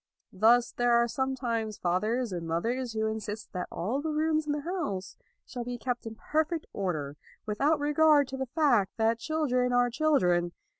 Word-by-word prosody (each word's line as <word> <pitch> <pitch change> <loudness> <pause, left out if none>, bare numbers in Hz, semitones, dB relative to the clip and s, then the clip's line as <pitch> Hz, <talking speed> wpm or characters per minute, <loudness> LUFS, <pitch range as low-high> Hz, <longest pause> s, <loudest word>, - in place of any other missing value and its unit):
Thus 230 +5 +4
there 245 0 +1
are 235 0 +4
sometimes 240 -4 -2
fathers 215 +7 0
and 170 -2 -4
mothers 230 +9 -1
who 220 0 -1
insist 220 -1 -4
that 180 -1 -3
all 230 +11 -2
the 320 - -3
rooms 310 0 0
in - - 0
the 295 0 -1
house 210 - -4 0.3
shall 245 - -6
be 245 0 -5
kept 240 0 -3
in 225 - -7
perfect 315 +6 -1
order, 155 -7 -3 0.3
without 280 +9 +1
regard 295 -1 +4
to 265 - -5
the 265 0 -3
fact, 245 - +2
that 225 +1 +2
children 255 -4 0
are 245 0 +3
children. 180 - +2
240 Hz, 170 wpm, -29 LUFS, 210-290 Hz, 0.3 s, Thus